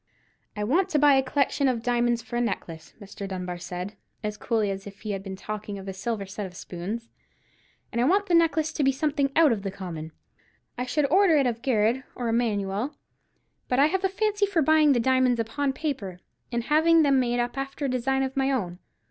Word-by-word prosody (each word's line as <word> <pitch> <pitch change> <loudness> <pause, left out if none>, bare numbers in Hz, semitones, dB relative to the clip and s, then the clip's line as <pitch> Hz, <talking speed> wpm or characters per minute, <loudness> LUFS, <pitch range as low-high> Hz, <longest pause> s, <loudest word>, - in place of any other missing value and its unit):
"I 210 - -2
want 345 - +2
to 310 - +1
buy 290 -1 +6
a 270 - +5
collection 275 +1 +1
of 240 -3 0
diamonds 240 -1 +1
for 240 - -7
a 240 - +1
necklace," 165 -8 -4
Mr. 200 -1 -8
Dunbar 180 -2 -5
said, 180 +3 -5 0.3
as 210 0 -2
coolly 215 -2 0
as 195 +1 -6
if 200 0 -12
he 215 - -4
had 195 -1 -3
been 195 -1 -6
talking 210 +1 -6
of 195 0 -9
a 195 - -4
set 215 +4 -3
of 195 - -6
silver 195 -1 -6
spoons; 195 +7 -6 0.8
"and 235 - 0
I - - +3
want 395 +7 +3
the 360 - -1
necklace 325 -1 +3
to 300 - 0
be 270 - +4
something 280 0 0
out 320 -4 +6
of 220 -4 -1
the 195 - -3
common. 175 -5 -7 0.6
I 250 +1 -3
should 290 +3 +1
order 370 -3 +5
it 275 - +3
of 235 -2 -1
Garrard 240 0 +1
or 240 -2 -2
Emanuel; 225 +2 -1 0.7
but 250 - 0
I 280 - +6
have 380 0 0
a 385 - +3
fancy 415 +1 +1
for 355 -6 +1
buying 310 0 +5
the 245 - +2
diamonds 255 0 +3
upon 270 +5 -1
paper, 260 - -4 0.3
and 235 -1 -1
having 320 +4 +4
them 275 -2 +4
made 245 -1 0
up 240 0 -1
after 275 +1 -4
a - - +1
design 265 +1 0
of 265 0 -3
my 270 0 +1
own. 180 -9 -2
245 Hz, 220 wpm, -26 LUFS, 205-285 Hz, 0.8 s, buy